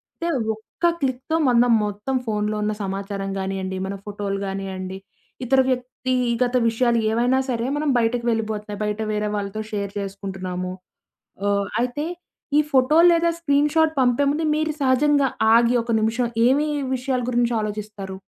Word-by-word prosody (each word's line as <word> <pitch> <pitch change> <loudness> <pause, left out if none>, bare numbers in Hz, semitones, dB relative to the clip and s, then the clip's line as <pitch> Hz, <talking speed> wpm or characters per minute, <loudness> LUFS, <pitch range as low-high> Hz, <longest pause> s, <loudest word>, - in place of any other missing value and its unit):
అంటే 340 - -4 0.3
ఒక్క 220 +10 -6 0.2
క్లిక్‌తో 265 +4 -1
మనం 240 -1 +4
మొత్తం 210 +6 -3
ఫోనులో 210 0 -1
ఉన్న 215 - 0
సమాచారం 195 0 -4
గానియండి, 190 0 -3
మన 200 - -4
ఫోటోలు 200 -1 -3
గానియండి 190 -1 -5 0.5
ఇతర 270 +2 +3
వ్యక్తిగత 250 -1 0
విషయాలు 235 +1 +2
ఏవైనా 245 +3 +2
సరే! 235 -2 -1
మనం 295 0 0
బయటకి 235 +1 0
వెళ్ళిపోతున్నాయి. 215 -2 -2
బయట 210 +1 -2
వేరే 210 0 -1
వాళ్ళతో 200 +1 -3
షేర్ 200 -2 -3
చేసుకుంటున్నాము. 190 -2 -5 0.8
ఆహ్, 200 0 +1 0.2
అయితే 250 +5 -2 0.5
ఈ - - +7
ఫోటో 265 +3 +4
లేదా 335 0 +3
స్క్రీన్ 290 -2 +2
షాట్ 320 -1 +4
పంపే 250 +2 +3
ముందు 315 +2 -1
మీరు 310 0 0
సహజంగా 275 +1 +3 0.3
ఆగి 235 +1 +4
ఒక 230 0 -2
నిమిషం 230 +2 +1 0.2
ఏమి 285 +4 +3 0.3
విషయాల 255 0 -1
గురించి 240 -1 +1
ఆలోచిస్తారు? 210 -2 -5
230 Hz, 140 wpm, -23 LUFS, 200-260 Hz, 0.8 s, ఈ